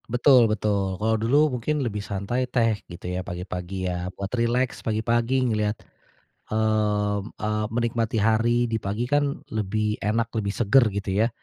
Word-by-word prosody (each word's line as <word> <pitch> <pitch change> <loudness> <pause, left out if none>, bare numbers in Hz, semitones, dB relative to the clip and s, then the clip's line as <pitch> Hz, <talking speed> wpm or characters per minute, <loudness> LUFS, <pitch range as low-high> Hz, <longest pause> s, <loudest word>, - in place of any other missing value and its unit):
Betul 125 -1 +5
betul. 100 -3 0
Kalau 110 +3 +1
dulu 140 +6 +3
mungkin 145 +3 -1
lebih 105 -3 -3
santai 105 +6 -2
teh 115 -4 +1
gitu 85 0 -10
ya, 90 +1 -2
pagi-pagi 90 +1 -5
ya, 90 0 -2
buat 100 0 -5
rileks 120 +1 0
pagi-pagi 115 +4 +1
ngelihat, 105 0 0 0.7
mmm, 105 -1 0
eee, 105 0 -1
menikmati 115 0 -1
hari 115 +3 +3
di 115 -2 -1
pagi, 105 +4 -2
kan 145 +2 0
lebih, 105 0 -1
enak 115 +2 0
lebih 105 -3 -1
segar 120 +2 +4
gitu 100 -1 -4 0.2
ya. - - 0
110 Hz, 150 wpm, -25 LUFS, 100-120 Hz, 0.7 s, Betul